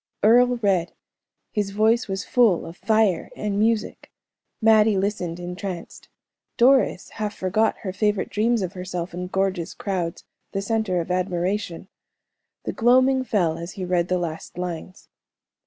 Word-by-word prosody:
Earle 245 +3 +5
read; 185 -4 +1 0.6
his 210 -3 -1
voice 220 +4 +2
was 195 0 -3
full 230 -8 +3
of 165 - -9
fire 215 -4 +1
and 205 -1 -2
music. 220 0 0 0.5
Mattie 220 -2 +5
listened 190 -4 -2
entranced. 180 0 -7 0.5
Doris 260 -5 +3
half 210 -1 -4
forgot 215 +4 +1
her 190 -3 -3
favorite 210 -1 0
dreams 225 0 +1
of 185 0 -4
herself 180 -2 -5
in 180 +1 -4
gorgeous 190 -2 -1
crowds, 180 -4 -3 0.3
the 195 - -1
center 215 -5 0
of 170 - -5
admiration. 180 0 -2 0.8
The - - -3
gloaming 255 +3 +4
fell 175 -9 0
as 170 +2 -7
he 185 - -5
read 175 -1 +1
the 185 - +1
last 165 -1 -5
lines. 180 +1 -6
195 Hz, 140 wpm, -23 LUFS, 180-220 Hz, 0.8 s, Earle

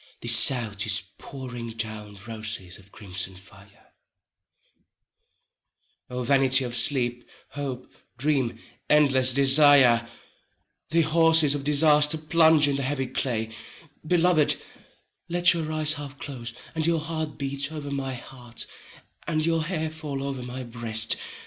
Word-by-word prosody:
The - - -7
South 115 -6 +4
is 100 -1 +2 0.2
pouring 120 -4 -8
down 110 -2 -6
roses 110 -5 -5
of 100 +1 -19
crimson 95 -2 -6
fire: 100 +2 -19 2.1
24 125 - -8
O 125 - -2
vanity 135 0 +3
of 120 -1 -5
Sleep, 120 0 0 0.3
Hope, 135 -3 -6 0.3
Dream, 130 -4 -1 0.3
endless 135 -4 +4
Desire, 135 -3 +5 0.8
The 165 +2 +2
Horses 160 -2 +4
of 145 -1 -4
Disaster 150 +1 +4
plunge 160 -1 +3
in 140 -1 -1
the - - -3
heavy 135 0 -1
clay: 120 -3 -3 0.5
Beloved, 170 -1 +2 0.7
let 175 +1 +3
your 160 -2 -4
eyes 155 -1 +3
half 145 -2 -8
close, 125 -6 -6 0.2
and 160 0 -1
your 170 -1 +1
heart 155 -1 -5
beat 140 +1 -3
Over 150 -2 -7
my 135 -2 -4
heart, 120 -1 -10 0.6
and 155 -2 0
your 165 -1 0
hair 160 -2 -3
fall 150 -4 -6
over 135 -2 -5
my 125 +1 -7
breast. 115 -2 0
135 Hz, 130 wpm, -25 LUFS, 120-155 Hz, 2.1 s, Desire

